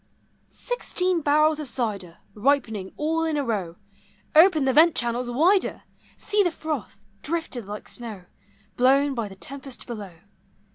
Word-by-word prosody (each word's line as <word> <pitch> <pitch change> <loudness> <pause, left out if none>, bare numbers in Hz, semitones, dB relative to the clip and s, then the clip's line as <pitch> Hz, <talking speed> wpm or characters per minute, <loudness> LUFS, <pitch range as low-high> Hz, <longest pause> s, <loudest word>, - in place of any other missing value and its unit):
Sixteen 370 -7 -1
barrels 305 +1 +3
of 300 - -4
cider 200 -9 -3 0.2
Ripening 220 -5 0
all 320 +2 0
in 320 -2 0
a 285 - 0
row! 195 -9 -2 0.6
Open 315 -2 +6
the 265 - +2
vent 320 +3 +6
channels 240 +1 -1
wider! 345 +11 +2 0.3
See 415 0 +1
the 365 - +3
froth, 310 - -5 0.2
drifted 290 - -3
like 210 +1 -7
snow, 220 -6 -7 0.5
Blown 275 +3 +4
by 230 -4 -3
the 195 - -11
tempest 270 +5 -8
below 210 -6 -7
270 Hz, 140 wpm, -25 LUFS, 225-315 Hz, 0.6 s, Open